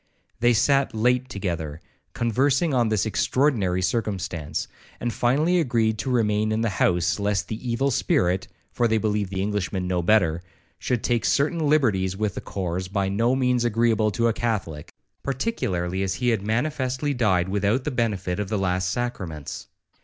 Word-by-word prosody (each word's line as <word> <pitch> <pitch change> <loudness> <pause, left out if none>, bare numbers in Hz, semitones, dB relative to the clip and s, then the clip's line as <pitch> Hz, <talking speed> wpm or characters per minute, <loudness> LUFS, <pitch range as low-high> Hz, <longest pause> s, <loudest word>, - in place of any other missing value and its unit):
They 120 0 +4
sat 135 +2 +2
late 125 +3 +1
together, 85 -8 -4 0.3
conversing 135 +7 +1
on 120 -3 +2
this 110 -1 +1
extraordinary 110 -6 +1
circumstance, 90 -7 -2 0.3
and 120 -1 -2
finally 150 +9 +2
agreed 115 -7 +1
to 110 - -2
remain 110 -3 +1
in 110 +1 0
the 115 -2 0
house, 90 +2 +2
lest 100 -3 -1
the 115 +3 -5
evil 135 +4 +1
spirit 90 -5 +1 0.2
(for 120 - +1
they 110 0 +2
believed 105 -2 0
the 95 0 -2
Englishman 100 -2 -2
no 90 -1 0
better) 85 -4 +3 0.4
should 125 -2 -1
take 120 -3 +1
certain 155 +4 +1
liberties 100 -11 +2
with 105 -2 -1
the - - -5
corse 90 -1 -3
by 100 0 -1
no 115 +6 +2
means 125 -2 +1
agreeable 115 -2 +2
to 115 +3 +1
a 115 - +2
Catholic, 100 -11 -3 0.3
particularly 95 - -2
as 95 -1 -1
he 125 -1 0
had 115 -4 +1
manifestly 130 +5 -1
died 95 -8 +2
without 100 +6 0
the 150 - -2
benefit 105 -7 -1
of 105 -2 -3
the 105 - 0
last 90 -1 0
sacraments. 90 - -4
110 Hz, 165 wpm, -24 LUFS, 95-125 Hz, 0.4 s, They